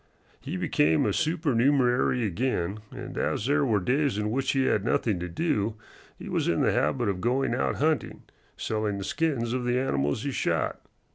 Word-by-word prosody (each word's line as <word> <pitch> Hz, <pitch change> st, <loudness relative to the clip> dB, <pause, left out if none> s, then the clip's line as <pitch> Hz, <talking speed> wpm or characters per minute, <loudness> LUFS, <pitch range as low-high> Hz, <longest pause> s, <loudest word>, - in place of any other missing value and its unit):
He -, -, -5 dB
became 80 Hz, +2 st, +2 dB
a 105 Hz, -, +1 dB
supernumerary 130 Hz, -, +2 dB
again, 105 Hz, -2 st, -1 dB
and -, -, -8 dB
as 105 Hz, -, -1 dB
there 145 Hz, +2 st, +2 dB
were 110 Hz, -6 st, +2 dB
days 130 Hz, +4 st, +1 dB
in 105 Hz, 0 st, -1 dB
which 135 Hz, +3 st, 0 dB
he 135 Hz, -1 st, +2 dB
had 105 Hz, -, +1 dB
nothing 110 Hz, -3 st, 0 dB
to 90 Hz, 0 st, -4 dB
do, 110 Hz, -, -1 dB, 0.4 s
he -, -, -9 dB
was -, -, -1 dB
in -, -, +1 dB
the -, -, +3 dB
habit 120 Hz, -4 st, +1 dB
of 95 Hz, -2 st, -1 dB
going 125 Hz, +2 st, +1 dB
out 125 Hz, -, 0 dB
hunting, 155 Hz, +1 st, -1 dB, 0.3 s
selling 110 Hz, -2 st, -2 dB
the 100 Hz, -, -4 dB
skins 125 Hz, -, -1 dB
of 130 Hz, -1 st, -1 dB
the 120 Hz, 0 st, +1 dB
animals 70 Hz, -, 0 dB
he -, -, -2 dB
shot. -, -, -1 dB
120 Hz, 185 wpm, -27 LUFS, 105-135 Hz, 0.4 s, the